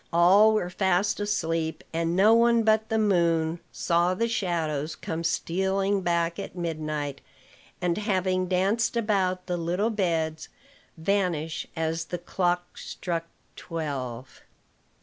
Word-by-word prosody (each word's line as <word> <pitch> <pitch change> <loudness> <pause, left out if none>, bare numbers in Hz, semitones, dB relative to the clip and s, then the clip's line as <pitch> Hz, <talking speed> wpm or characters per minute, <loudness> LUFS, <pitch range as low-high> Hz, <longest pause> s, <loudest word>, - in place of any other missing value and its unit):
All 195 +6 +6
were 180 -4 -1
fast 190 +2 +1
asleep; 165 -6 -1
and 165 +1 0
no 205 +4 +6
one 235 0 +4
but 220 0 +2
the 225 - +1
moon 170 -5 +2
saw 175 +1 +1
the 230 +5 0
shadows 165 -8 -1
come 165 +1 -4
stealing 190 +4 0
back 170 0 0
at 195 - -7
midnight, 155 -4 -3 0.6
and, 175 -1 0
having 185 -3 0
danced 195 +6 +1
about 190 -5 0
the 180 -1 -2
little 180 +7 0
beds, 165 -6 -1 0.5
vanish 165 -3 -1
as 160 0 -1
the 175 - -4
clock 175 0 -2
struck 170 -2 -4 0.3
twelve. 135 -6 -5
175 Hz, 125 wpm, -26 LUFS, 165-200 Hz, 0.6 s, All